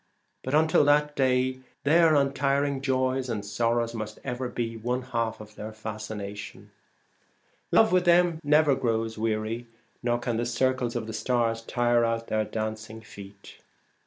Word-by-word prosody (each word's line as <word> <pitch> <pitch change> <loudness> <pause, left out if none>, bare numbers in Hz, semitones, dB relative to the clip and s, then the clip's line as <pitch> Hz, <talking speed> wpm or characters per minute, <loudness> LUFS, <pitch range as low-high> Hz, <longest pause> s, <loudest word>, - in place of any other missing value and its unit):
But 130 +3 -1
until 160 0 +4
that 150 0 +3
day 130 -1 +1 0.2
their 160 +2 +5
un 140 -1 +2
tiring 140 -1 0
joys 130 -1 0
and 105 -3 -3
sorrows 115 +2 0
must 110 -1 -5
ever 125 -1 -3
be 115 -2 -3
one 125 +3 -2
half 115 -3 -2
of 105 0 -11
their 105 +1 -7
fascination. 110 -2 -7 1.0
Love 220 - +5
with 180 0 +3
them 175 -1 +4
never 150 0 +4
grows 115 -4 -1
weary, 110 +2 -2 0.3
nor 120 -1 +1
can 120 -1 -2
the 120 - -1
circles 125 0 0
of 115 -2 -2
the 110 - -6
stars 115 -2 0
tire 120 0 +1
out 115 0 -1
their 110 0 +1
dancing 110 0 -5
feet. 100 -2 -13
120 Hz, 155 wpm, -27 LUFS, 110-135 Hz, 1.0 s, their